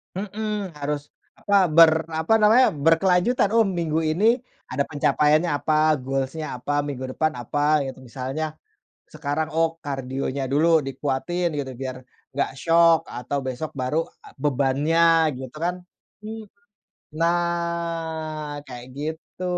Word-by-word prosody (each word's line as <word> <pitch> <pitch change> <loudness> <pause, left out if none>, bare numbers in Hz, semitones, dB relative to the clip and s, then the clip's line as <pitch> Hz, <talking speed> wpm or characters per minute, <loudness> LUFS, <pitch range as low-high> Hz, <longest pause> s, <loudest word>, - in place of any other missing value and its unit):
Mhm. 205 -2 -4
Harus, 145 0 -3 0.3
apa, 205 -1 +1 0.2
ber 165 0 +8 0.2
apa 160 +7 +1
namanya, 225 +4 +6
berkelanjutan. 180 - +3
Oh, 225 - +6
minggu 165 -5 -1
ini 200 +10 +3 0.4
ada 140 +2 +1
pencapaiannya 150 +2 +2
apa, 155 0 +2
goals-nya 135 +1 -3
apa, 145 +3 -1
minggu 130 -2 -5
depan 155 -1 +1
apa, 145 +5 +1
gitu. 130 0 -9
Misalnya 135 +5 -4 0.5
sekarang, 155 +1 -3
oh, 165 0 +1
kardionya 135 0 -3
dulu 160 +3 +4
dikuatin 145 +6 -2
gitu, 140 -3 -3
biar 130 -1 -5 0.3
enggak 140 - 0
syok 165 +1 +4
atau 125 +4 -4
besok 130 +4 -4
baru, 130 +6 0 0.2
eee, - - -14
bebannya, 145 +4 +2 0.3
gitu 130 -1 -8
kan, 175 +3 -1 0.5
hmm. 220 0 -6 0.7
Nah, 165 -2 -2
kayak 125 -2 -9
gitu, 160 +4 -6
155 Hz, 125 wpm, -24 LUFS, 140-170 Hz, 0.7 s, ber